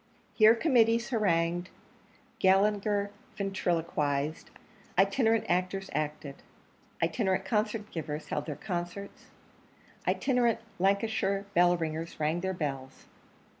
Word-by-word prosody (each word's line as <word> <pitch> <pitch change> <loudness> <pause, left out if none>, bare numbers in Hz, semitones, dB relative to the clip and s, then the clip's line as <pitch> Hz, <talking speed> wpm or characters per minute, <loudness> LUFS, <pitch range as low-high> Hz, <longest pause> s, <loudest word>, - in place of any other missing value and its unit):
Here 220 +1 +6
committees 230 -4 +3
harangued; 175 -5 +1 0.7
Gallagher 200 +1 +2 0.3
ventriloquised; 165 -6 -1 0.5
itinerant 220 +4 +3
actors 185 +2 -1
acted; 150 -1 -3 0.7
itinerant 190 -5 0
concert 210 +1 -1
givers 155 -2 -5
held - - -3
their 150 - -3
concerts; 180 +3 -6 0.8
itinerant 245 -4 +2 0.2
Lancashire 200 0 +1
bell 175 0 +4
ringers 160 0 -4
rang 155 +3 0
their 190 +1 -2
bells. 135 -6 -5
190 Hz, 95 wpm, -30 LUFS, 165-210 Hz, 0.8 s, Here